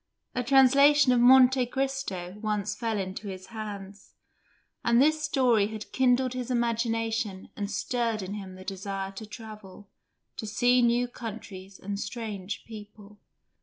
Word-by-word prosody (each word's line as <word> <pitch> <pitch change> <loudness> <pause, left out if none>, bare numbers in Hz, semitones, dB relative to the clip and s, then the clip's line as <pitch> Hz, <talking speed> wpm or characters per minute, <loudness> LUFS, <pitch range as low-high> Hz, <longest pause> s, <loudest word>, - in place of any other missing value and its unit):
A 250 - -1
translation 275 +2 +6
of 245 - +4
"Monte 255 +1 +6
Cristo" 255 -9 -3
once 210 -1 -1
fell 225 0 -2
into 190 +2 -5
his 190 -1 -7
hands, 205 -2 -8 0.7
and 235 0 +4
this 310 +3 +3
story 255 -8 +2
had 215 0 -8
kindled 255 0 +2
his 255 -1 -4
imagination 225 -4 -1
and 205 -1 -4
stirred 225 +1 -1
in 185 +2 -5
him 195 -3 -7
the 185 0 -12
desire 195 0 -4
to 210 +2 -9
travel, 210 -3 -11 0.5
to 220 - -5
see 245 +4 +3
new 240 +1 +2
countries 205 -5 -9
and 200 +1 -5
strange 210 -4 -5
people. 210 -1 -12
220 Hz, 140 wpm, -28 LUFS, 200-245 Hz, 0.7 s, translation